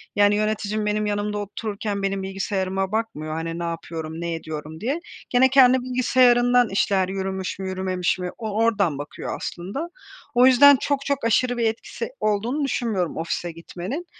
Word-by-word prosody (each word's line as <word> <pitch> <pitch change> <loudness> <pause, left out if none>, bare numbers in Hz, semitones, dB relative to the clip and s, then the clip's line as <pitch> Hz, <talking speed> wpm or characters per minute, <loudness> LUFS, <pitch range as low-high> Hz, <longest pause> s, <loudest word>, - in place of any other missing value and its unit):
yani, 205 0 +4
yöneticim 215 0 -1
benim 210 0 0
yanımda 210 0 -1
otururken 205 0 -4
benim 195 0 -1
bilgisayarıma 190 0 -2
bakmıyor, 215 -9 -3
hani, 165 +1 -4
ne - - -3
yapıyorum, 165 -1 -5
ne 170 -1 -2
ediyorum 160 -1 -6
diye. 275 +9 -1 0.3
Gene, 260 +1 +5
kendi 260 -1 +6
bilgisayarından 245 -1 +3
işler 195 -1 +1
yürümüş 190 -1 -3
mü, 190 0 -3
yürümemiş 185 -1 -1
mi, 180 - -3
o 220 -2 -4
oradan 200 -10 +2
bakıyor 145 0 -6
aslında. 200 - -5 0.5
O 245 +1 +6
yüzden 280 +2 +8
çok 280 -1 -1
çok 280 -4 -1
aşırı 245 +2 +2
bir 235 - +1
etkisi 230 +1 -4
olduğunu 215 +7 0
düşünmüyorum 215 - -1
ofise 170 +1 -3
gitmenin. 180 - -6
205 Hz, 155 wpm, -23 LUFS, 185-240 Hz, 0.5 s, yüzden